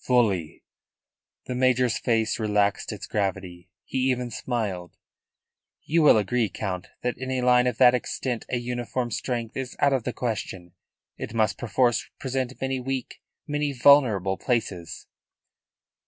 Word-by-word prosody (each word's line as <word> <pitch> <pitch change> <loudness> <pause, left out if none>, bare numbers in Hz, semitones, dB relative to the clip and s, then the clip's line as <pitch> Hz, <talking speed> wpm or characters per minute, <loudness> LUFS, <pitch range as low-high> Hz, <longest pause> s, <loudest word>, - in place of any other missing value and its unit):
"Fully." 105 -10 +1 0.8
The 125 - -4
major's 125 -2 +2
face 115 -3 0
relaxed 105 -2 +1
its - - -6
gravity. 95 -3 -3 0.2
He 130 0 0
even 125 -1 -1
smiled. 105 -8 -3 0.9
"You 165 +2 +2
will 150 - +7
agree, 110 +2 +1
Count, 95 -4 -4 0.2
that 125 -1 -2
in 130 0 -5
a 130 -1 -1
line 125 0 +5
of 125 -2 -1
that 125 -1 +7
extent 125 -1 -2
a 125 - 0
uniform 120 0 -3
strength 120 -2 -3
is 130 -1 -5
out 140 -1 +3
of 130 -4 0
the 125 - -2
question. 95 -8 -4 0.4
It 115 - -6
must 110 -3 +1
perforce 120 +1 +1
present 130 -1 -3
many 135 0 -1
weak, 130 0 -4 0.2
many 150 -1 -1
vulnerable, 120 -8 +4
places." 90 -9 -2
120 Hz, 140 wpm, -25 LUFS, 105-130 Hz, 0.9 s, will